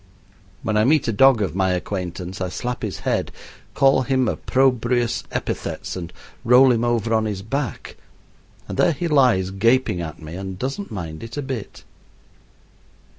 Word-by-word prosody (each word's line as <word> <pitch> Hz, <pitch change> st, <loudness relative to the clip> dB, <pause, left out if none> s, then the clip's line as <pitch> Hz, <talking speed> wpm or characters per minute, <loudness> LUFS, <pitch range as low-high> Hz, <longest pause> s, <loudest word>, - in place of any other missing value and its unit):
When 110 Hz, -1 st, 0 dB
I 105 Hz, -, +4 dB
meet 145 Hz, +3 st, +3 dB
a -, -, +2 dB
dog 125 Hz, 0 st, +5 dB
of 90 Hz, -4 st, -3 dB
my 95 Hz, -1 st, +2 dB
acquaintance 90 Hz, 0 st, -4 dB
I 90 Hz, -, -1 dB
slap 125 Hz, +6 st, -4 dB
his -, -, -4 dB
head, -, -, -1 dB, 0.4 s
call 135 Hz, -1 st, +4 dB
him 130 Hz, -1 st, +1 dB
opprobrious 125 Hz, -1 st, +1 dB
epithets, -, -, -4 dB
and 85 Hz, -3 st, -6 dB, 0.3 s
roll 125 Hz, +2 st, +6 dB
him 115 Hz, -1 st, +1 dB
over 115 Hz, -1 st, 0 dB
on 110 Hz, 0 st, +2 dB
his 100 Hz, -3 st, -4 dB
back; 130 Hz, -, -4 dB, 0.7 s
and -, -, -6 dB
there 170 Hz, -, +4 dB
he 170 Hz, +4 st, -3 dB
lies, 125 Hz, -, +3 dB
gaping 115 Hz, -1 st, +2 dB
at 80 Hz, -2 st, -6 dB
me, 80 Hz, 0 st, -9 dB
and 95 Hz, 0 st, -6 dB
doesn't 135 Hz, -, -4 dB
mind 80 Hz, -6 st, -6 dB
it 115 Hz, +3 st, -8 dB
a 145 Hz, -, -2 dB
bit. 130 Hz, -6 st, -6 dB
115 Hz, 165 wpm, -22 LUFS, 95-130 Hz, 0.7 s, roll